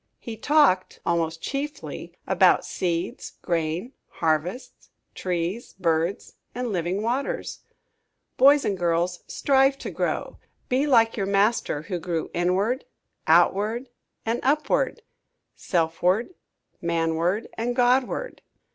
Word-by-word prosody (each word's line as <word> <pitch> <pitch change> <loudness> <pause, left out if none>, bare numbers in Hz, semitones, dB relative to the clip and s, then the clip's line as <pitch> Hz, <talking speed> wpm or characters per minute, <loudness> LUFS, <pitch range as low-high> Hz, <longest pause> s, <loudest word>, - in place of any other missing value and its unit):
He 230 - -7
talked, 225 -7 +3
almost 165 -1 -1
chiefly, 285 +2 -5
about - - +4
seeds, 170 -2 -3
grain, 170 - -2
harvests, 165 - -2 0.2
trees, 180 +5 -3
birds 170 +1 -1 0.2
and 245 -1 -2
living 180 +3 -1
waters. 275 - -2 0.8
Boys 280 +1 +6
and 200 - 0
girls, 175 0 0
strive 270 0 +3
to - - -6
grow. - - -3 0.3
Be 265 +4 +2
like 230 -5 +4
your 195 -2 -1
Master 200 -6 +1
who 180 0 -4
grew 165 -1 -3
inward, 195 +9 0 0.4
outward, 205 +9 +3 0.4
and 230 +2 0
upward; 300 - +1 0.5
selfward, 180 - 0 0.5
manward, 170 +4 0
and 240 +2 -2
Godward. 255 - +1
195 Hz, 105 wpm, -25 LUFS, 170-250 Hz, 0.8 s, Boys